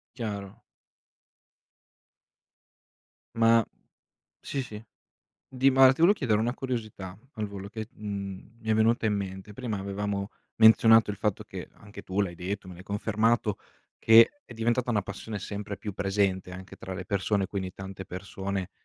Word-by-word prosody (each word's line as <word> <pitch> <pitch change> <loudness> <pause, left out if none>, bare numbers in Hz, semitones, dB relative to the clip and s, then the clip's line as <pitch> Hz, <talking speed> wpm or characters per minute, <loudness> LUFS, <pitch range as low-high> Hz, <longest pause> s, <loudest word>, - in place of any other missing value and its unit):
Chiaro. 100 -5 -5 2.7
Ma 115 0 +5 0.8
sì, 135 -2 -3
sì. 105 -4 -8 0.7
Di 130 +1 +3
mal 130 0 +7
ti 135 - -17
volevo 175 +5 +7
chiedere 110 - +1
una 120 +2 0
curiosità 110 -8 -5 0.2
al 110 -2 -3
volo, 100 -1 -7
che 110 0 -5
t 115 - -30
mhmm, 100 +1 -6
mi 110 - -6
è - - +5
venuta 110 +1 +3
in 105 - +2
mente: 95 0 -5
prima 115 -2 -3
avevamo 100 0 -3 0.3
menzionato 115 -1 +7
il 100 - -7
fatto 105 0 -1
che, - - -8
anche 100 0 -12
tu 95 +2 -1
l'hai 90 -3 -2
detto, 95 +2 -4
me 90 - -9
l'hai 90 - -12
confermato, 110 +1 +1 0.4
che 115 - +6
è - - -11
diventata 120 +2 0
una 105 -3 +2
passione 105 +2 -6
sempre 100 0 -5
più 105 - -6
presente 95 -2 0
anche 95 +1 -10
tra 95 - -7
le 95 0 -6
persone, 100 0 0
quindi 95 -2 -4
tante 95 0 -8
persone 95 +1 -4
105 Hz, 155 wpm, -28 LUFS, 95-115 Hz, 2.7 s, mal